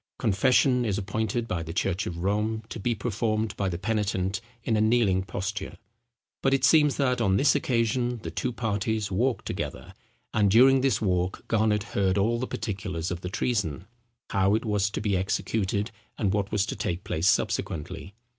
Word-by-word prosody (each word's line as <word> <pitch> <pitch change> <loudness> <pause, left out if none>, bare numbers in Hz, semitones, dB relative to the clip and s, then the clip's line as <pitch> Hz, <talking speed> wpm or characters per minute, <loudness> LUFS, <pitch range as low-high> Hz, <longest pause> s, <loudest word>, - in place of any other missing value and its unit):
Confession 125 +4 +3
is 105 -4 0
appointed 110 +3 -2
by 90 -5 -2
the 80 0 -6
church 95 +2 0
of 85 - -5
Rome 105 +3 0
to - - -6
be 120 +3 0
performed 110 -1 -1
by 100 -1 -1
the 85 - -3
penitent 100 -2 -1 0.2
in 115 - +1
a 105 - +2
kneeling 110 -4 +3
posture; 100 +1 -4 0.6
but 135 0 +3
it 135 - +2
seems 150 -3 +5
that, 125 -3 +1
on 95 -3 +3
this 145 - +4
occasion, 120 -2 0
the - - -5
two 125 - -2
parties 110 -2 -1
walked 120 +7 0
together; - - -5 0.4
and 105 -2 +3
during 130 +5 +6
this 135 -4 +1
walk 90 -1 -1
Garnet 105 -2 +2
heard 95 -1 +2
all 115 +4 +2
the 130 - -2
particulars 95 -6 -4
of 90 -1 -4
the 90 - -4
treason—how 105 - -2
it 110 - -2
was 105 -2 +1
to 100 - -4
be 105 -2 0
executed—and 100 +2 -2
what 100 0 -1
was 105 -2 +1
to - - -4
take 90 +1 -3
place 80 +4 -1
subsequently. 90 +5 -1
105 Hz, 175 wpm, -27 LUFS, 95-115 Hz, 0.6 s, during